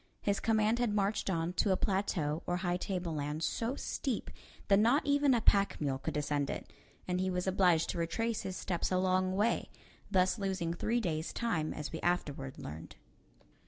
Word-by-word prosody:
His 200 -1 +1
command 220 +1 +2
had 235 -4 +1
marched 200 0 0
on 170 -1 -1
to 195 +2 +2
a 190 - +3
plateau 175 -6 0
or 175 - +1
high 180 -1 0
tableland 160 -5 -3
so 235 +8 -1
steep 260 -4 -3 0.4
that 195 0 +5
not 240 +7 +4
even 285 -2 +4
a 235 - +1
pack 200 -2 +3
mule 135 -3 -1
could - - -4
descend 145 -1 0
it, - - -6 0.3
and 180 0 0
he 185 - 0
was 180 -1 -1
obliged 180 -4 +3
to 170 - -4
retrace 225 +7 -1
his 185 -1 -4
steps 175 -1 -2
a 185 - +3
long 185 0 +2
way, 215 +4 +1 0.4
thus 185 +3 +2
losing 190 -4 -1
three 230 +7 0
days' 160 -5 -2
time, 170 -10 -1
as 150 - -5
we 160 - -5
afterward 145 -6 -1
learned. 80 +3 -8
185 Hz, 185 wpm, -33 LUFS, 165-210 Hz, 0.4 s, that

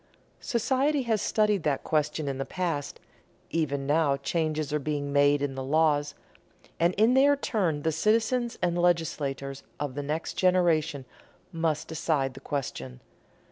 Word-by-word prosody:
Society 265 +4 +1
has 220 -4 0
studied 210 -3 +2
that 145 -3 -1
question 150 -1 0
in 135 -1 -3
the - - 0
past; 165 -4 -3 0.5
even 140 -4 -1
now 145 -1 +2
changes 155 0 -2
are 150 - +1
being 145 -1 -3
made 145 0 +4
in 140 -1 -1
the 135 0 -5
laws; 145 +1 +1 0.6
and 170 +2 +2
in 220 +4 +4
their 280 +2 +5
turn 180 - -1
the 160 - +1
citizens 225 - +1
and 175 0 +1
legislators 140 -6 -1 0.2
of 145 -3 -3
the 145 - -3
next 150 +3 -3
generation 165 -6 +2 0.5
must 160 -2 -1
decide 150 -4 -1
the 135 - -10
question. 65 - -5
155 Hz, 145 wpm, -27 LUFS, 145-180 Hz, 0.6 s, their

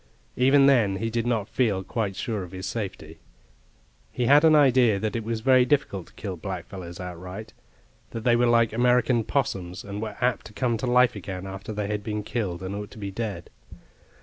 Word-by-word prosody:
Even 135 +2 +5
then 115 -8 +4
he 115 +3 -3
did 115 +1 -1
not 110 -4 0
feel 105 -7 0
quite 100 0 -3
sure 105 +1 -3
of 90 -1 -9
his 95 0 -6
safety. 105 -5 -5 0.9
He 125 - -1
had 145 +4 +6
an 160 -1 +6
idea 130 -7 +4
that 110 +1 -2
it 115 - -2
was 115 0 -3
very 130 +1 +5
difficult 125 - 0
to - - -20
kill 95 -4 -6
blackfellows 90 -1 -7
outright, 90 +4 -8 0.6
that 115 - -6
theywere 120 0 +3
like 115 -2 +3
American 125 0 +3
'possums, 95 -9 -2
and 100 +1 -6
were 110 -2 -5
apt 125 -2 0
to 105 - -16
come 120 +1 0
to 125 - -3
life 125 -1 +4
again 95 -1 -6
after 95 +2 -7
they 105 -1 -3
had 105 0 -3
been 105 0 -3
killed, 95 -6 -3
and 95 +1 -4
ought 105 0 -5
to - - -14
be 100 -2 -5
dead. 100 -5 -5
110 Hz, 200 wpm, -25 LUFS, 95-120 Hz, 0.9 s, had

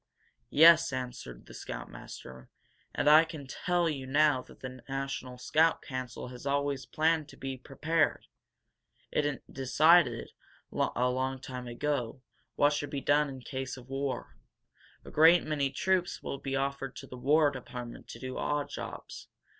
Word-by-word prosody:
"Yes," 165 +1 +7
answered 125 - -6
the - - -13
scoutmaster. 65 0 -9 0.5
"And - - 0
I 155 +2 +9
can 160 -3 -8
tell 175 +5 0
you 135 -4 -3
now 145 -1 +3
that - - -17
the 130 -1 -7
National 135 -2 -4
Scout 160 +6 +2
Council 130 -2 -5
has 125 -1 -10
always 140 -1 -1
planned 160 -1 +1
to - - -14
'Be 135 0 -4
Prepared!' 155 +5 0 0.9
It 145 -2 -1
decided, 140 -1 +4 0.4
a 125 +1 +1
long 130 +1 -1
time 125 -1 -7
ago, 125 0 -2 0.3
what 145 +1 +4
should 145 -1 -2
be 140 - -3
done 145 +1 +3
in 135 -1 -8
case 130 +1 -5
of 130 0 -13
war. 135 0 -3 0.7
A - - -10
great 165 +3 +6
many 145 -3 0
troops 185 +3 0
will 140 - -4
be 135 -1 -3
offered 135 0 -2
to - - -8
the 130 - -10
War 145 +4 +3
Department 125 -3 -8
to - - -9
do 130 -1 -5
odd 145 -1 -1
jobs. - - -8
135 Hz, 155 wpm, -30 LUFS, 130-150 Hz, 0.9 s, I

